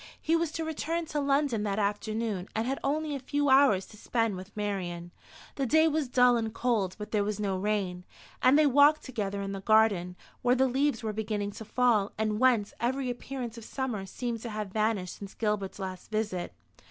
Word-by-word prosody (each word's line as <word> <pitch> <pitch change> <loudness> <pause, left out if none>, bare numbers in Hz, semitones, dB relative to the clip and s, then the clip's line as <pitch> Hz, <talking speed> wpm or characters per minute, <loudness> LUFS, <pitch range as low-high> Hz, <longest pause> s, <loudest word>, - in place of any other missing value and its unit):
He 325 - +1
was 330 -2 0
to 325 - -3
return 325 +2 -2
to 300 -1 -3
London 280 -5 +1
that 205 -1 -1
afternoon, 210 -1 -1
and 220 +1 0
had 270 +2 -2
only 300 +2 0
a - - -3
few 285 +2 0
hours 265 -8 +5
to 215 - -15
spend 225 -2 0
with 185 +4 -10
Marian. 180 -4 -3 0.5
The 270 -2 0
day 315 +5 +5
was 310 -2 0
dull 250 -1 +5
and 225 -1 -2
cold, 215 -6 0
but 210 0 -7
there 210 -2 +2
was 210 +1 -3
no 200 -2 0
rain; 190 -2 -1 0.4
and 260 +3 +6
they 305 - +5
walked 290 +2 +5
together 200 -6 -3
in 195 - -4
the 195 -1 -5
garden, 200 -4 +3 0.3
where 245 0 +3
the 265 +1 +3
leaves 265 -1 0
were 215 -1 -2
beginning 210 -1 -2
to 220 - -9
fall, 225 -3 +2
and 215 -1 0
whence 240 -5 +3
every 255 +2 0
appearance 245 -1 -6
of - - -12
summer 225 -5 -4
seemed 235 +2 -4
to 235 - -5
have 210 -3 -5
vanished 215 -4 -1
since 200 -1 -9
Gilbert's 210 -3 -2
last 190 -2 -6
visit. 215 -5 -2
220 Hz, 200 wpm, -29 LUFS, 205-265 Hz, 0.5 s, and